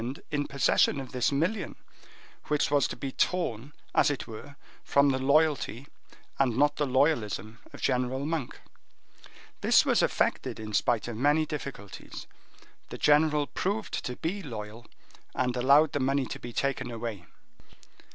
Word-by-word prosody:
in 145 -1 -1
possession 140 +1 +2
of 135 - -7
this 125 +1 +1
million, 170 +10 -1 0.7
which 150 -1 +1
was 145 -1 +3
to - - -6
be 135 - -5
torn, 140 -6 -1 0.2
as - - +4
it 145 -3 -3
were, 120 +6 -10 0.3
from 140 0 +3
the 130 -1 0
loyalty 140 -3 +2 0.5
and 125 -4 +2
not 145 +1 +3
the 150 - 0
loyalism 120 -5 0
of - - -11
General 125 +2 0
Monk. 155 -5 -3 1.0
This - - +5
was - - +3
effected - - 0
in 110 -1 -7
spite 110 +1 +1
of 115 -2 -5
many 145 +5 +3
difficulties: 140 -10 -7 0.6
the - - -7
general 150 0 +3
proved 205 +8 -3
to 125 - -4
be 190 +9 -3
loyal, 110 - -8 0.5
and 125 -1 0
allowed 140 +5 +5
the 145 - -1
money 135 0 +1
to - - -7
be 120 - -8
taken 135 +2 -1
away." 115 -5 -6
135 Hz, 150 wpm, -28 LUFS, 120-150 Hz, 1.0 s, This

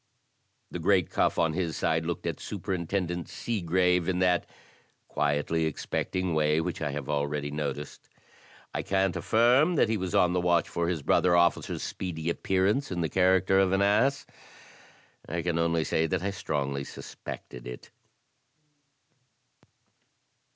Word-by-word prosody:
The 90 - -4
great 90 +1 +2
Cuff, - - +1
on 80 -2 +2
his 85 -2 -2
side, 80 0 0
looked 85 - -3
at - - -3
Superintendent 90 -2 -3
Seegrave 90 -4 0
in 90 - 0
that 90 -1 +2 0.6
quietly 75 +2 0
expecting 90 +3 -2
way 75 0 +2
which 85 +1 -3
I 75 - -1
have 70 -1 -5
already 70 0 -1
noticed. 75 -1 -5 0.6
I - - -1
can't 95 -1 0
affirm 125 +9 +3
that 125 - +3
he 110 - +1
was 95 -2 -3
on 90 -1 +4
the 90 - +1
watch 85 -1 +2
for 85 0 -2
his 85 -5 -2
brother 90 +4 +3
officer's 85 0 +1
speedy 85 -3 -3
appearance 95 +10 0
in 90 -1 -2
the 80 - 0
character 95 0 +3
of 95 -1 +3
an 95 +1 +3
ass 135 +8 +2 0.5
— - - -23
I 85 0 -2
can 85 -1 0
only 85 -1 +1
say 80 +1 +1
that 90 +2 -1
I 100 - -1
strongly 70 -7 -2
suspected 60 -2 -9
it. 60 0 -9
85 Hz, 150 wpm, -28 LUFS, 80-95 Hz, 0.6 s, on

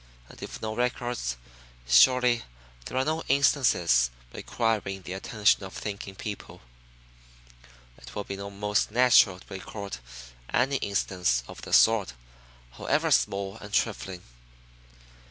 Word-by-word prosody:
And - - -14
if - - -8
no 110 0 -2
records, 120 - -2 0.5
surely 120 - +5 0.4
there - - -5
are 130 - +2
no 160 +1 -1
instances 125 - +3 0.2
requiring 105 -5 -2
the 90 - -6
attention 105 +1 +1
of 95 - -8
thinking 100 -2 -6
people. 105 +1 -8 1.4
"It - - -13
would 105 - -4
be 100 - -5
most 100 +1 -1
natural 115 -5 +5
to 95 - -13
record 100 -1 -7 0.5
any 135 +3 +2
instance 90 - 0
of - - -11
the - - -9
sort, 110 - +4 0.6
however - - 0
small 95 - +1
and 105 -1 -11
trifling. 95 -4 -1
105 Hz, 120 wpm, -27 LUFS, 95-120 Hz, 1.4 s, surely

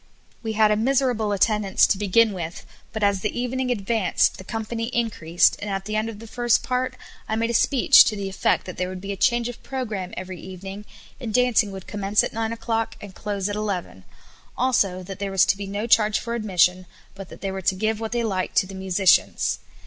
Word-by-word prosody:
We 220 -1 -3
had 215 0 +4
a - - +4
miserable 245 -2 +1
attendance 205 -1 +3
to - - +2
begin 210 +2 +3
with, 170 -2 -6 0.3
but 220 -2 -4
as 200 -1 +2
the 215 +3 -2
evening 250 +1 -2
advanced 220 -3 +1
the - - -8
company 225 +3 -4
increased, 210 -9 +1
and 205 - -4
at 195 -1 -3
the 215 +1 -3
end 215 +1 0
of 220 - -8
the 225 - -11
first 240 +1 +1
part 255 0 -1 0.3
I 220 - 0
made 230 +1 0
a - - -3
speech 255 +2 +6
to 215 - 0
the 200 -1 -4
effect 195 - 0
that 185 - -8
there 180 0 -2
would 185 0 -6
be 200 +2 -6
a - - -3
change 240 +4 +2
of 245 - -8
programme 215 -9 -5
every 185 -1 -6
evening, 190 +2 -8 0.3
and 240 -5 -5
dancing 245 -3 +3
would 190 -1 -8
commence 205 0 +1
at - - -4
nine 225 0 -2
o'clock 225 -1 -2
and 200 -2 -10
close 200 0 -3
at 205 - -3
eleven; 195 - -4 0.5
also 200 -8 +1
that 190 0 -8
there 200 -1 -2
was 195 -1 +4
to - - +2
be 200 0 -6
no 205 +3 -3
charge 215 -2 +4
for 235 - -4
admission, 185 -5 +1 0.3
but 195 -1 -10
that - - -12
they 195 - -2
were 190 0 -5
to 190 +1 +1
give 215 +2 -1
what 225 -1 -4
they 240 0 0
liked 190 -4 -2
to - - +4
the 195 - -10
"musicians. 190 0 +2
210 Hz, 225 wpm, -23 LUFS, 190-230 Hz, 0.5 s, speech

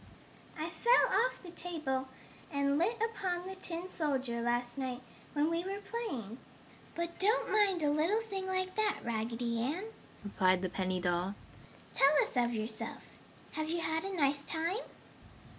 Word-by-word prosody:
"I 310 +1 -2
fell 475 +6 +4
off - - -10
the 350 - -8
table 305 -7 -2 0.4
and 280 0 +2
lit 440 +7 +1
upon 360 -4 -2
the 380 0 -5
tin 350 -1 -4
soldier 270 -9 -1
last 240 +1 0
night 255 -1 -3 0.3
when 295 +1 +3
we 335 +1 0
were 390 +2 -3
playing. 275 - -4 0.6
But 340 0 -3
don't 430 +5 +3
mind 395 -6 +4
a 290 - +4
little 330 +9 +2
thing 390 -4 -4
like 370 0 -1
that, 430 -1 +1
Raggedy 230 +1 -1
Ann," 310 - -1 0.4
replied 185 -2 +3
the 185 - 0
penny 185 0 -1
doll. 180 +2 0 0.6
"Tell 275 +2 +6
us - - -6
of 240 -1 +3
yourself! 220 -1 -3 0.5
Have 310 0 -2
you 340 +1 0
had 320 0 0
a 390 0 -3
nice 280 -2 +3
time?" 330 +6 -1
310 Hz, 160 wpm, -33 LUFS, 240-370 Hz, 0.6 s, Tell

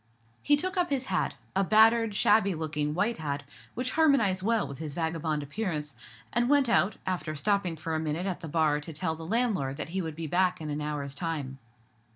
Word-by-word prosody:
He 290 - +4
took 370 +5 -1
up 355 -1 +2
his 270 -2 -1
hat—a 195 - -1
battered, 220 +1 +5
shabby 200 -3 +4
looking 150 -1 -2
white 210 +6 +1
hat, 145 -2 -3 0.3
which 250 +1 -1
harmonized 275 -13 +3
well 225 +2 +1
with 140 - -8
his 155 -3 -5
vagabond 160 -2 -1
appearance—and 150 - -3
went 285 -2 +4
out, 210 -3 +3
after 175 -4 -2
stopping 195 +1 0
for 160 +1 -4
a 160 - 0
minute 160 +3 -2
at 190 -3 -2
the 165 - -7
bar 155 -1 +2
to 160 +2 -7
tell 160 +2 -1
the 165 - -9
landlord 200 - 0
that 150 - -4
he 190 +3 -2
would 160 -3 -5
be 165 +1 -5
back 180 +3 +1
in 155 -2 -5
an 145 +1 -3
hour's 145 -2 -3
time. 140 -4 -4
165 Hz, 195 wpm, -29 LUFS, 150-215 Hz, 0.3 s, battered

